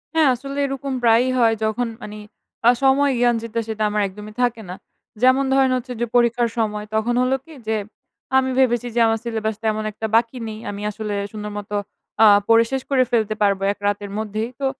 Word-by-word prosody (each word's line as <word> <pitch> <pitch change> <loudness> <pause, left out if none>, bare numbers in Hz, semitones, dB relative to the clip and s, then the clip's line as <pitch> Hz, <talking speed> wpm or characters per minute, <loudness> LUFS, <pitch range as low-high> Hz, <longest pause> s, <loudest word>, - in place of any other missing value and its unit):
হ্যাঁ, 315 -3 +5
আসলে 275 +3 -7
এরকম 275 0 -4
প্রায়ই 235 +2 +4
হয়। 230 -2 +4
যখন 220 +3 0
মানি 210 -1 -8 0.5
আ - - +8
সময় 275 +1 +4
জ্ঞান 240 -1 +3
যেটা, 230 0 -3
সেটা 220 -1 -2
আমার 210 0 0
একদমই 210 +2 -10
থাকে 240 -2 0
না। 180 - -5 0.5
যেমন 260 +2 +5
ধরেন 270 -1 +3
হচ্ছে 250 0 -6
যে, - - +2
পরীক্ষার 240 0 +3
সময়, 210 -2 -1
তখন 220 +2 +1
হলো 255 +1 +2
কি? 325 - -14
যে, 220 - +1 0.6
আমি 260 0 +2
ভেবেছি 245 -2 +2
যে, - - +2
আমার 225 0 +1
সিলেবাস 220 -2 -2
তেমন 215 0 0
একটা 220 +1 -4
বাকি 230 +2 +2
নেই। 215 0 -7
আমি 205 0 -6
আসলে 210 0 -5 0.2
সুন্দর 210 -1 -6
মত 205 -1 -7 0.5
আ - - +9 0.2
পড়ে 230 0 +6
শেষ 265 0 -1
করে 265 -2 +4
ফেলতে 220 -2 +1
পারব, 200 -2 +3
১ - - -29
রাতের 205 0 -2
মধ্যেই। 215 +1 -3
তো 275 - -2
230 Hz, 200 wpm, -21 LUFS, 215-255 Hz, 0.6 s, আ